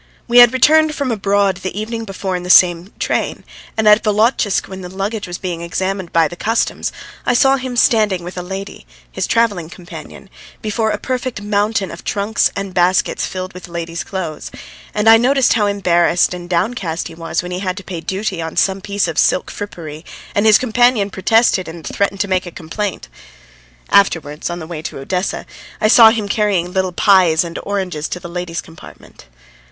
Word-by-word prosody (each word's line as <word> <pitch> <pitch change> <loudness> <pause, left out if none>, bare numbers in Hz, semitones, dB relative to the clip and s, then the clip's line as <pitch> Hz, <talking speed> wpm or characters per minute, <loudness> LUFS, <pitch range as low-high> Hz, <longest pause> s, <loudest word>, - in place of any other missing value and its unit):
We 240 0 +6
had 240 -1 +9
returned 305 +4 +4
from 280 -3 -2
abroad 200 -2 +1
the 185 +2 -5
evening 225 +1 -4
before 195 -2 -4
in 180 - -3
the 180 - -7
same 180 +1 +5
train, - - -2 0.3
and 220 -1 +2
at 210 +1 +6
Volotchisk 215 -1 +1
when 190 0 -8
the 180 - -7
luggage 200 +3 -4
was 175 0 -5
being 175 -3 -5
examined 185 +2 -3
by 165 -1 +3
the 175 - -9
Customs, 225 +6 -1 0.3
I 245 - +1
saw 270 +2 +5
him 255 -1 -5
standing 210 -6 +3
with 175 +1 -8
a 180 - -4
lady, 190 - -7 0.2
his - - -3
travelling 205 -8 +1
companion, 175 +1 -11 0.3
before 220 +1 -1
a 210 - -1
perfect 250 -2 -4
mountain 205 -1 0
of 170 - -10
trunks 205 +2 0
and 195 -1 -4
baskets 180 +1 +1
filled 185 0 -6
with 180 0 -10
ladies' 170 -1 -5
clothes, 170 -6 -5 0.4
and 210 +1 -1
I 225 0 +9
noticed 260 +2 +3
how 210 -3 +2
embarrassed 180 -3 +2
and 175 -1 -8
downcast 175 -2 -1
he - - -11
was 165 +1 -3
when 180 - -7
he 180 - -3
had 185 -1 -3
to 195 - -7
pay 175 -4 -6
duty 190 -1 -3
on 160 0 -6
some 195 0 +1
piece 200 -1 -1
of 165 - -2
silk - - +2
frippery, 160 -6 -8 0.3
and 205 +2 +2
his 215 - +7
companion 240 -4 +2
protested 195 0 +2
and 165 0 -9
threatened 200 -1 -1
to 200 - -1
make 185 -1 0
a - - -7
complaint. 180 - -5 0.8
Afterwards, 165 -7 +2
on 175 - -4
the 160 - -7
way 160 -2 -6
to - - -6
Odessa, 180 +8 -3 0.3
I 215 - +2
saw 225 -1 +9
him 220 -2 -1
carrying 200 -5 0
little 190 -1 0
pies 180 -3 +4
and 170 -1 -6
oranges 185 -6 -3
to 180 - -5
the 175 - -9
ladies' 175 -1 -4
compartment. 165 - -15
190 Hz, 190 wpm, -17 LUFS, 175-215 Hz, 0.8 s, had